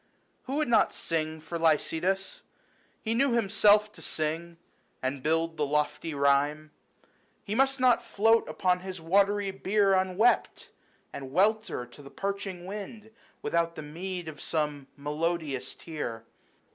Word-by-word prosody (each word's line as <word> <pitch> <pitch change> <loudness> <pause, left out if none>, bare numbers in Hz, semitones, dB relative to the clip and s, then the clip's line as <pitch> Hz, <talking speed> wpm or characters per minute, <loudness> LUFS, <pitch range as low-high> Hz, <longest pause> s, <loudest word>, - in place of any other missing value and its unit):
~Who 265 - -3
would 305 -1 +1
not 230 -2 +4
sing 160 -1 -2
for 170 +2 -5
Lycidas? 165 +4 +1 0.6
he 225 - 0
knew 270 +5 +3
10 250 - 0
Himself 210 -1 +4
to - - -15
sing, 165 +2 -3 0.4
and 130 +1 -3
build 165 +2 0
the 150 - +1
lofty 150 +2 -1
rhyme. 145 +2 +2 0.7
He 200 - -4
must 270 +3 +2
not 250 -2 +4
float 225 +2 +3
upon 180 -1 +1
his 185 0 -7
watery 200 +4 +2
bier 195 +1 +2
Unwept, 190 +5 +2 0.4
and 135 -1 -7
welter 205 - +1
to 120 +4 -15
the 140 - -11
parching 195 0 -4
wind, 210 +3 -7 0.3
Without 170 0 0
the 155 - -6
meed 175 +3 -5
of 155 -2 -8
some 150 -3 -2
melodious 150 -2 -2
tear. 120 -9 -6
170 Hz, 140 wpm, -28 LUFS, 150-205 Hz, 0.7 s, not